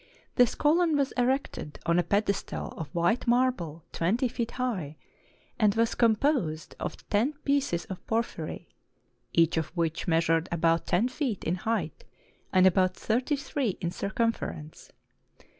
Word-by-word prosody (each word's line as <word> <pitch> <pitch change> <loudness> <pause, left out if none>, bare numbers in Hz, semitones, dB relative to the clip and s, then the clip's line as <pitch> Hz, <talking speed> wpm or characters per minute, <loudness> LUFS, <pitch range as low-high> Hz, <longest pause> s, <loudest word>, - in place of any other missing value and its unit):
This 245 -2 +4
column 320 +1 +3
was 275 -1 +1
erected 250 - -1
on 170 +1 +3
a - - +2
pedes 200 +3 +1
tal - - -6
of 160 - -6
white 175 - 0
marble 235 -11 +1
twenty 220 +10 +1
feet 235 -1 -3
high; 195 - -2 0.6
and 210 -3 +4
was 230 0 +2
composed 220 - +1
of - - -6
ten 230 +8 +2
pieces 280 -12 +1
of 190 - -8
porphyry, 230 +1 -2 0.6
each 165 -1 +3
of 160 -2 0
which 165 +2 -1
measured 165 0 +2
about 165 -1 +1
ten 190 +7 +2
feet 255 - -3
in 165 - 0
height, 225 - -2 0.5
and 185 -1 +5
about 185 0 +4
thirty 245 +6 0
three 275 -6 -2
in 170 -2 -2
circumfer 230 +5 -1
ence. 155 0 -12
205 Hz, 145 wpm, -28 LUFS, 170-250 Hz, 0.6 s, and